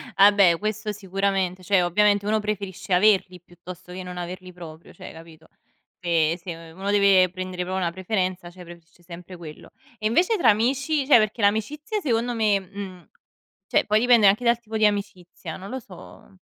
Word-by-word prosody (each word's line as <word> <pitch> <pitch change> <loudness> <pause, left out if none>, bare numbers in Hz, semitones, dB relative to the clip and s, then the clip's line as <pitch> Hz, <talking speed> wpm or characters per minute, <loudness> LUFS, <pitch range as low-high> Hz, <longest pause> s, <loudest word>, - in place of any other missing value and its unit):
Vabbè 195 -3 +5
questo 215 0 -3
sicuramente, 195 -2 -2
cioè 190 +1 +2
ovviamente 205 +3 +2
uno 215 +1 +1
preferisce 200 -3 -4
averli 185 -2 +2
piuttosto 180 +1 -13
che 185 +1 -7
non 180 0 -8
averli 180 +1 -7
proprio, 165 -2 -12
cioè, - - -11
capito. 160 -1 -15 0.6
Se 165 -1 +1
se 175 -1 -6 0.2
u - - -19
uno 195 +1 -2
deve 200 -3 +4
prendere 185 0 -5
proprio 185 +1 -4
una 175 -2 -1
preferenza, 185 -1 -3
cioè 180 0 -13
preferisce 170 0 -16
sempre 175 +1 -11
quello. 160 -3 -12 0.3
E 215 - -4
invece 355 - +2
tra 255 - +4
amici? 270 +7 0
Cioè 275 - +7
perché 215 +2 -1
l'amicizia 290 - -1
secondo 240 - -1
me 215 -3 +2
mhmm, 190 -2 -10 0.6
cioè - - +2
poi 215 +1 +2
dipende 240 -3 +5
anche 205 +5 +3
dal 235 0 +3
tipo 225 -2 -7
di 215 -1 +4
amicizia, 195 -5 -4
non 190 +1 -10
lo 260 - -4
so. 195 -3 -15
195 Hz, 180 wpm, -23 LUFS, 180-215 Hz, 0.6 s, Cioè